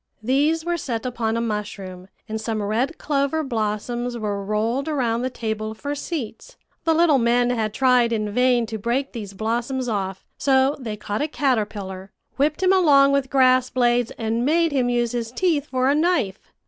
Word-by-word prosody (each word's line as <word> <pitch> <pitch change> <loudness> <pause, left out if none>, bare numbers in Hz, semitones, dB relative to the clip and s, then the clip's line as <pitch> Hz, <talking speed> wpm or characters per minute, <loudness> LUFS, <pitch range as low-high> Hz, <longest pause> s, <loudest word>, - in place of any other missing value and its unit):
These 295 +7 +1
were 345 0 0
set 245 -6 -4
upon 230 -2 -1
a - - 0
mushroom, 200 -4 -5 0.2
and 220 0 -4
some 220 -1 -2
red 235 +10 -1
clover 290 +2 0
blossoms 240 0 -2
were 205 -3 -3
rolled 225 +7 -1
around 245 -6 0
the 255 - -1
table 220 -3 -4
for 285 +6 -4
seats. 290 - -6 0.3
The 325 -1 +3
little 320 -4 +4
men 240 +1 +2
had 220 -3 -1
tried 250 0 +3
in 215 -2 -1
vain 250 +1 +3
to 220 -1 -5
break 245 +6 -1
these 205 -5 -7
blossoms 235 +5 -2
off; 195 -4 -3
so 270 +1 +3
they 220 -5 -5
caught 210 +2 -3
a 300 - +1
caterpillar, 205 -9 -2 0.3
whipped 300 +5 +1
him 375 +1 +5
along 285 -7 +5
with 280 -2 +1
grass 255 -1 +4
blades, 240 -1 +2
and 225 +1 -1
made 330 +4 +2
him 255 -3 +1
use 240 -1 +1
his 235 -2 -3
teeth 310 0 0
for 255 -2 0
a 275 - +4
knife. 300 - 0
245 Hz, 180 wpm, -23 LUFS, 220-275 Hz, 0.3 s, him